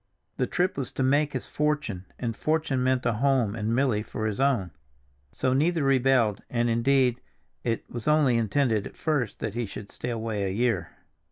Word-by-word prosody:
The - - +1
trip 180 -3 0
was 130 - -4
to 135 - -1
make 145 +3 +2
his 130 - -3
fortune, 150 -11 -1
and 115 -2 -3
fortune 155 -3 0
meant 130 -1 +1
a 115 - +2
home 125 -2 +2
and 110 +1 -1
Milly 125 -5 +2
for 110 0 -5
his 110 +1 -2
own; 130 -10 +1 0.6
so 130 - 0
neither 160 +3 +2
rebelled, 130 -6 +3
and, 120 -1 +1
indeed, 125 +1 +2 0.4
it 115 -2 -2
was 120 +2 -7
only 150 -5 +4
intended 115 -1 +1
at - - -15
first 140 -8 -1
that - - -2
he 120 -1 -2
should 100 +1 -9
stay 125 - -5
away 110 -3 -2
a 95 - 0
year. 110 -1 0
125 Hz, 185 wpm, -27 LUFS, 110-140 Hz, 0.6 s, only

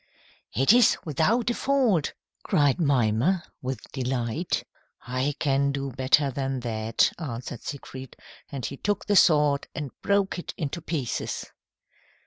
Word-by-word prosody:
"It 135 - +5
is 245 -2 +5
without 215 - +1
a - - 0
fault," 245 - +1 0.3
cried 145 +2 +2
Mimer 140 - +2 0.2
with 130 0 -4
delight. 130 +4 -2 0.4
"I 130 +3 -1
can 140 -1 +2
do 140 -1 -3
better 135 +2 +3
than 135 -1 -2
that," 110 -1 +1
answered 125 -6 -5
Siegfried, 130 -2 -8 0.4
and 135 -4 -4
he 140 - -5
took 205 +4 -1
the 205 - +1
sword 150 -5 +4
and 145 -3 -4
broke 200 -2 +1
it - - -7
into 155 +2 -3
pieces. 155 -6 -3
140 Hz, 130 wpm, -26 LUFS, 130-170 Hz, 0.4 s, It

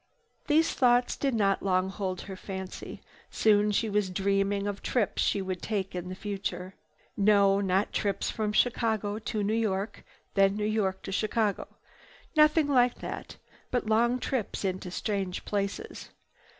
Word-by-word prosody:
These 315 +2 +3
thoughts 245 -2 +3
did 275 -4 0
not 200 -3 +2
long 185 -1 +1
hold 190 -2 -3
her 195 - -7
fancy. 190 0 -7 0.3
Soon 210 -1 +3
she 220 +2 +1
was 205 -2 0
dreaming 195 +1 0
of 205 -1 -3
trips 230 -6 0
she 200 - +1
would 185 +1 -5
make 200 -3 -1
in 180 0 -5
the 185 - -5
future. 195 -2 -4 0.4
No, 200 -1 +4
not 190 +1 +1
trips 200 -2 -1
from 215 -2 -1
Chicago 220 -2 +1
to 215 -1 -2
New 205 +2 0
York, 210 -2 -1 0.3
then 195 0 +4
New 210 0 -1
York 205 -3 0
to - - -5
Chicago. 215 +1 0 0.7
Nothing 305 0 +5
like 250 -3 +3
that, - - -7 0.3
but 245 -2 -1
long 235 +3 +3
trips 250 -5 -3
into 185 -1 -2
strange 190 0 -3
places. 205 - -3
205 Hz, 150 wpm, -29 LUFS, 195-225 Hz, 0.7 s, Nothing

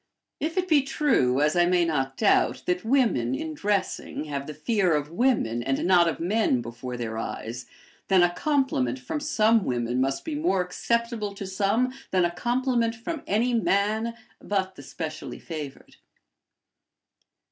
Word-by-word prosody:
If 325 +4 -3
it 370 0 +1
be 310 -5 +5
true, 235 - +2
as 150 +2 +2
I 175 0 +4
may 175 -1 +3
not 135 -5 -1
doubt, 210 - +2
that 180 0 0
women, 225 - +2
in 155 +4 -4
dressing, 200 -2 -2
have 140 -2 -5
the 150 - -5
fear 185 0 +1
of 150 +1 -2
women 175 - +1
and 135 +2 -1
not 175 -2 +5
of 165 - -2
men 180 - +1
before 120 +1 -6
their 110 -2 -4
eyes, 120 +2 -5 0.4
then 190 -2 +5
a 175 0 +2
compliment 255 - 0
from 125 - -4
some 225 -7 +3
women 120 -1 -1
must 135 +1 -1
be 320 - -3
more 295 - +1
acceptable 225 +3 -2
to 200 - -6
some 205 +7 0 0.2
than 185 -2 +2
a 170 - 0
compliment 240 +3 0
from 275 +7 -5
any 235 +5 +1
man 220 +1 +1 0.2
but 190 -2 -2
the - - -10
specially 155 -2 -6
favored. 150 -5 -8
185 Hz, 160 wpm, -26 LUFS, 140-235 Hz, 0.4 s, be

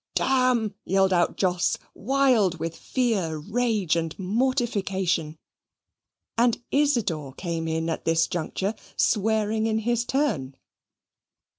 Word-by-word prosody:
"D - - +2
n!" 255 -5 +2
yelled 190 0 +2
out 175 -1 +2
Jos, 180 -2 +1 0.2
wild 245 -8 +2
with 165 +1 -3
fear, 205 -11 -1
rage, 210 0 0
and 165 -1 -2
mortification; 195 - 0 1.0
and 235 -1 +3
Isidor 225 - +1
came 165 0 -3
in 160 0 -1
at 165 - -3
this 165 0 +3
juncture, 190 +4 -2 0.2
swearing 220 +1 +1
in 220 -1 +1
his 235 +1 0
turn. 210 - -1
200 Hz, 115 wpm, -25 LUFS, 165-240 Hz, 1.0 s, and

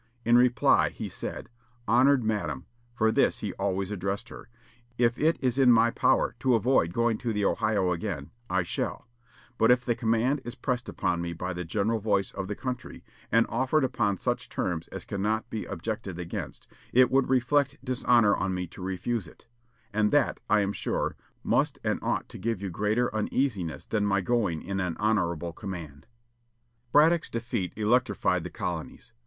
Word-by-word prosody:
In 120 +1 +5
reply 125 0 +4
he - - -6
said, - - -5 0.4
"Honored 130 +3 +4
Madam," 90 -11 -2 0.3
for 110 -2 +3
thus - - +2
he - - -4
always 95 0 -2
addressed 100 +3 -3
her, - - -11 0.5
"if 120 0 +2
it 160 +2 +3
is 130 0 0
in 130 -2 +6
my 115 0 +5
power - - +2
to 130 -1 +3
avoid 115 -7 +2
going 115 +2 +1
to 120 -3 -2
the 105 -2 0
Ohio 100 -4 +1
again, 85 -5 -4 0.2
I 90 0 +1
shall; 85 - -4 0.5
but 115 - +4
if 125 0 +4
the 120 - +2
command 115 +4 +1
is 120 +1 -7
pressed 125 0 -2
upon 85 -1 -1
me 85 0 -3
by 90 +2 -4
the 90 +1 -4
general 105 +6 0
voice 100 -2 0
of 95 -1 -5
the 105 - -3
country, 125 0 -6 0.3
and 115 +1 +4
offered 130 +5 +1
upon 110 -6 0
such - - -2
terms 85 -3 -2
as - - -8
cannot 110 +3 -2
be 110 - -3
objected 105 -5 -5
against, 85 -1 -6 0.3
it 125 0 +5
would 135 -1 +3
reflect 135 +2 +2
dishonor 120 -4 +3
on 95 -1 -1
me 90 0 -2
to 90 - -12
refuse 95 +2 -2
it; - - -17 0.5
and 105 0 +2
that, 145 0 +2
I 105 0 +4
am 100 0 -1
sure, - - -2 0.3
must - - +1
and - - 0
ought - - -1
to - - -9
give 115 +1 -1
you 100 -1 -4
greater 105 +7 0
uneasiness 110 - -1
than 105 -2 0
my 100 0 +2
going 100 -7 0
in 95 +1 -3
an 90 -3 -2
honorable 85 -6 0
command." 80 -7 -8 0.8
Braddock's 160 +4 +4
defeat 115 -6 -3
electrified 110 -5 +1
the 90 - -5
colonies. 85 -2 -5
110 Hz, 175 wpm, -28 LUFS, 95-120 Hz, 0.8 s, in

